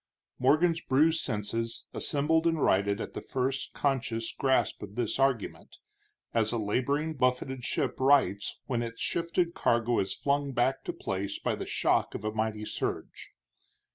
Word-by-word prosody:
Morgan's 160 Hz, +6 st, +3 dB
bruised 155 Hz, +5 st, +3 dB
senses 115 Hz, 0 st, -3 dB
assembled 160 Hz, +3 st, +1 dB
and 165 Hz, -1 st, +1 dB
righted 100 Hz, -4 st, +2 dB
at -, -, -5 dB
the -, -, -5 dB
first 135 Hz, +1 st, -2 dB
conscious 120 Hz, -5 st, -1 dB
grasp 130 Hz, -4 st, +1 dB
of 105 Hz, 0 st, -8 dB
this 120 Hz, +1 st, -1 dB
argument, 135 Hz, -5 st, -1 dB, 0.6 s
as 110 Hz, -1 st, +3 dB
a 120 Hz, -, 0 dB
laboring, 140 Hz, +9 st, 0 dB
buffeted 130 Hz, -1 st, 0 dB
ship -, -, -1 dB
rights 130 Hz, -7 st, +3 dB
when 120 Hz, -3 st, -1 dB
its 115 Hz, -1 st, -5 dB
shifted 170 Hz, 0 st, 0 dB
cargo 120 Hz, -4 st, +2 dB
is 95 Hz, -, -1 dB
flung 140 Hz, -1 st, 0 dB
back 130 Hz, +2 st, +1 dB
to -, -, -1 dB
place 95 Hz, +1 st, -3 dB
by -, -, -1 dB
the -, -, -5 dB
shock -, -, +1 dB
of -, -, -5 dB
a 110 Hz, -, 0 dB
mighty 110 Hz, -1 st, -2 dB
surge. -, -, -4 dB
125 Hz, 155 wpm, -29 LUFS, 110-140 Hz, 0.6 s, Morgan's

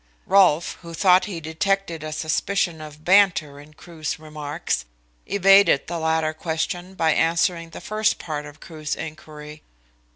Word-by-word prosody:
Rolfe, 185 Hz, -5 st, +3 dB
who 170 Hz, -1 st, -9 dB
thought 185 Hz, +1 st, +4 dB
he 190 Hz, -5 st, -5 dB
detected 165 Hz, +1 st, -2 dB
a 155 Hz, -, -5 dB
suspicion 160 Hz, +2 st, -1 dB
of 150 Hz, 0 st, -11 dB
banter 175 Hz, -7 st, +3 dB
in 150 Hz, +1 st, -16 dB
Crewe's 160 Hz, 0 st, -6 dB
remarks, 150 Hz, -, -4 dB, 0.4 s
evaded 195 Hz, -6 st, +5 dB
the 170 Hz, 0 st, -4 dB
latter 160 Hz, -1 st, 0 dB
question 175 Hz, +3 st, -4 dB
by 160 Hz, -3 st, +2 dB
answering 165 Hz, 0 st, +1 dB
the -, -, -10 dB
first 215 Hz, 0 st, 0 dB
part 150 Hz, -2 st, -5 dB
of 145 Hz, +1 st, -14 dB
Crewe's 155 Hz, -2 st, -5 dB
inquiry. 155 Hz, -1 st, -9 dB
160 Hz, 140 wpm, -23 LUFS, 155-180 Hz, 0.4 s, evaded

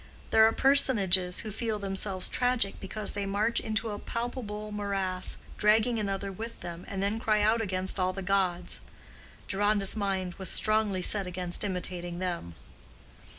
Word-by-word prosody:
There 220 Hz, 0 st, +7 dB
are -, -, +3 dB
personages 200 Hz, -10 st, +4 dB
who 215 Hz, -, -6 dB
feel 220 Hz, +1 st, -2 dB
themselves 195 Hz, -1 st, +1 dB
tragic 245 Hz, -5 st, 0 dB
because 215 Hz, -1 st, -4 dB
they 200 Hz, -1 st, -3 dB
march 210 Hz, +4 st, +1 dB
into 220 Hz, 0 st, -2 dB
a 205 Hz, -, -5 dB
palpable 220 Hz, -3 st, -5 dB
morass, 195 Hz, -3 st, -1 dB, 0.2 s
dragging 220 Hz, +2 st, +3 dB
another 195 Hz, -1 st, -2 dB
with 225 Hz, +4 st, -8 dB
them, 170 Hz, 0 st, -7 dB
and 195 Hz, -1 st, -3 dB
then 205 Hz, +3 st, 0 dB
cry 215 Hz, -2 st, +2 dB
out 225 Hz, +2 st, +3 dB
against 190 Hz, -2 st, -2 dB
all 185 Hz, 0 st, +2 dB
the 195 Hz, +1 st, -6 dB
gods. 185 Hz, -2 st, 0 dB, 0.7 s
Deronda's 205 Hz, 0 st, +2 dB
mind 190 Hz, -3 st, -2 dB
was 190 Hz, -2 st, 0 dB
strongly 215 Hz, -4 st, +1 dB
set 200 Hz, -1 st, +1 dB
against 180 Hz, 0 st, -1 dB
imitating 180 Hz, -2 st, -4 dB
them. 175 Hz, -, -4 dB
200 Hz, 150 wpm, -29 LUFS, 185-215 Hz, 0.7 s, There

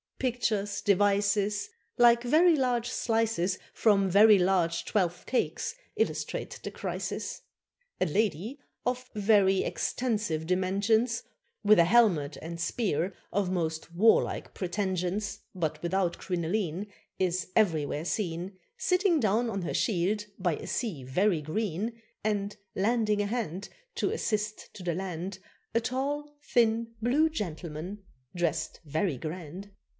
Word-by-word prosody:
Pictures, 210 Hz, -5 st, -1 dB
devices, 205 Hz, +1 st, +2 dB, 0.3 s
Like 240 Hz, 0 st, +6 dB
very 320 Hz, +7 st, +5 dB
large 245 Hz, -3 st, +1 dB
slices 225 Hz, -7 st, 0 dB, 0.2 s
From 200 Hz, -3 st, +3 dB
very 210 Hz, +3 st, +7 dB
large 180 Hz, -3 st, +2 dB
twelfth 180 Hz, -5 st, 0 dB
cakes, 260 Hz, -, -1 dB, 0.2 s
illustrate 445 Hz, -, -2 dB
the -, -, -3 dB
crisis. -, -, -4 dB, 0.6 s
A -, -, +3 dB
lady 205 Hz, -, -1 dB, 0.3 s
of 250 Hz, +1 st, -2 dB
very 200 Hz, -2 st, +4 dB
extensive 210 Hz, -11 st, -1 dB
dimensions, 200 Hz, +6 st, +1 dB, 0.4 s
With 210 Hz, -2 st, +6 dB
a 170 Hz, -, +7 dB
helmet 170 Hz, -, +3 dB
and 170 Hz, +1 st, -7 dB
spear 180 Hz, -2 st, 0 dB, 0.2 s
of 195 Hz, -2 st, 0 dB
most 165 Hz, -2 st, -2 dB
warlike 220 Hz, +5 st, +3 dB
pretensions, 190 Hz, +1 st, -2 dB, 0.2 s
But 155 Hz, -4 st, -2 dB
without 175 Hz, 0 st, 0 dB
crinoline, 180 Hz, +1 st, -2 dB, 0.3 s
Is 185 Hz, -1 st, 0 dB
everywhere 160 Hz, -7 st, +2 dB
seen 175 Hz, +1 st, -3 dB, 0.2 s
Sitting 365 Hz, -2 st, +2 dB
down 225 Hz, +1 st, +2 dB
on 195 Hz, -4 st, -3 dB
her 170 Hz, -, -3 dB
shield 210 Hz, +1 st, +1 dB
by 180 Hz, -4 st, 0 dB
a -, -, -8 dB
sea 200 Hz, -, -2 dB
very 170 Hz, +6 st, +1 dB
green; 210 Hz, +7 st, -2 dB, 0.2 s
And 205 Hz, -1 st, -1 dB, 0.2 s
lending 210 Hz, 0 st, +2 dB
a 205 Hz, -, 0 dB
hand 205 Hz, -4 st, -3 dB, 0.3 s
To -, -, 0 dB
assist 215 Hz, -1 st, -2 dB
to 190 Hz, -, -9 dB
the 170 Hz, -2 st, -1 dB
land 185 Hz, +1 st, -4 dB, 0.4 s
A -, -, +5 dB
tall, 290 Hz, +5 st, -2 dB
thin, 230 Hz, -1 st, +2 dB
blue 275 Hz, +8 st, +3 dB
gentleman, 180 Hz, -, -5 dB, 0.3 s
dressed 165 Hz, -3 st, -1 dB
very 155 Hz, 0 st, -1 dB
grand. 175 Hz, +6 st, -7 dB
200 Hz, 125 wpm, -29 LUFS, 175-225 Hz, 0.6 s, very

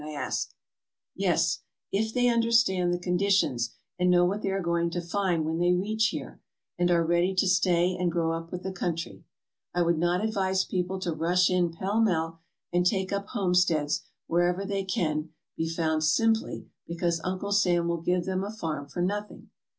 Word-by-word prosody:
I 155 Hz, 0 st, -7 dB
asked. 145 Hz, -, -3 dB, 0.3 s
" -, -, -65 dB
Yes, -, -, +1 dB, 0.3 s
if 220 Hz, +2 st, 0 dB
they 245 Hz, +1 st, +2 dB
understand 230 Hz, -6 st, +3 dB
the 175 Hz, -, +1 dB
conditions 180 Hz, -9 st, +1 dB, 0.2 s
and 180 Hz, 0 st, +3 dB
know 175 Hz, 0 st, +5 dB
what 200 Hz, +4 st, -1 dB
they 195 Hz, -, -1 dB
are 195 Hz, 0 st, 0 dB
going 170 Hz, -1 st, 0 dB
to 175 Hz, -, -3 dB
find 175 Hz, -2 st, 0 dB
when 160 Hz, +1 st, -1 dB
they 175 Hz, +1 st, +3 dB
reach 215 Hz, +5 st, +1 dB
here -, -, -6 dB, 0.3 s
and 175 Hz, 0 st, +1 dB
are 170 Hz, -1 st, +3 dB
ready 175 Hz, +3 st, +2 dB
to 190 Hz, +1 st, +2 dB
stay 180 Hz, -1 st, +3 dB
and 180 Hz, -1 st, 0 dB
grow 165 Hz, -1 st, 0 dB
up 165 Hz, 0 st, -5 dB
with 180 Hz, -, -5 dB
the 190 Hz, -, -3 dB
country. 170 Hz, -3 st, -4 dB, 0.5 s
I 175 Hz, -, +3 dB
would 170 Hz, -1 st, +1 dB
not 175 Hz, +4 st, +1 dB
advise 190 Hz, -3 st, 0 dB
people 185 Hz, +1 st, -2 dB
to 175 Hz, -3 st, -1 dB
rush 175 Hz, +4 st, +2 dB
in 180 Hz, -2 st, +2 dB
pell 195 Hz, +6 st, -1 dB
mell 165 Hz, -6 st, 0 dB, 0.3 s
and 175 Hz, 0 st, +3 dB
take 190 Hz, +1 st, 0 dB
up 200 Hz, 0 st, -2 dB
home 190 Hz, -4 st, -1 dB
steads 160 Hz, -5 st, +2 dB, 0.2 s
wherever 175 Hz, +3 st, +1 dB
they 195 Hz, -1 st, -2 dB
can 155 Hz, -4 st, -1 dB, 0.3 s
be 160 Hz, 0 st, -2 dB
found 160 Hz, -1 st, 0 dB
simply 225 Hz, +8 st, +1 dB, 0.2 s
because 170 Hz, 0 st, -1 dB
Uncle 185 Hz, +2 st, -3 dB
Sam 180 Hz, -4 st, +3 dB
will 170 Hz, -1 st, -1 dB
give 180 Hz, +1 st, 0 dB
them 190 Hz, 0 st, -1 dB
a 200 Hz, -, -4 dB
farm 160 Hz, -9 st, -4 dB
for 175 Hz, +5 st, -3 dB
nothing. 205 Hz, +3 st, -4 dB
180 Hz, 190 wpm, -27 LUFS, 170-195 Hz, 0.5 s, know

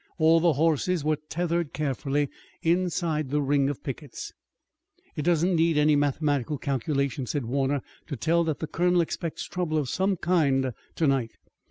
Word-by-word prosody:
All 165 Hz, 0 st, +5 dB
the 170 Hz, -1 st, +3 dB
horses 160 Hz, +3 st, +1 dB
were 155 Hz, 0 st, +1 dB
tethered 170 Hz, -2 st, -1 dB
carefully 145 Hz, 0 st, -1 dB, 0.4 s
inside 165 Hz, -4 st, 0 dB
the 150 Hz, +2 st, +1 dB
ring 140 Hz, -1 st, +2 dB
of 145 Hz, -, -5 dB
pickets. 135 Hz, -1 st, -6 dB, 0.8 s
"It -, -, -2 dB
doesn't 175 Hz, +3 st, +2 dB
need 165 Hz, -1 st, +3 dB
any 150 Hz, 0 st, +4 dB
mathematical 145 Hz, -1 st, 0 dB
calculation," 140 Hz, -1 st, -1 dB
said 135 Hz, +2 st, -2 dB
Warner, 135 Hz, +2 st, 0 dB, 0.2 s
"to 140 Hz, -, -4 dB
tell 165 Hz, +6 st, +2 dB
that 155 Hz, -4 st, -1 dB
the -, -, -3 dB
colonel 175 Hz, +2 st, +2 dB
expects 165 Hz, 0 st, -3 dB
trouble 175 Hz, -3 st, -2 dB
of 145 Hz, -4 st, -1 dB
some 190 Hz, +4 st, +1 dB
kind 140 Hz, -8 st, +2 dB, 0.2 s
tonight. 135 Hz, -7 st, 0 dB
150 Hz, 155 wpm, -26 LUFS, 140-165 Hz, 0.8 s, All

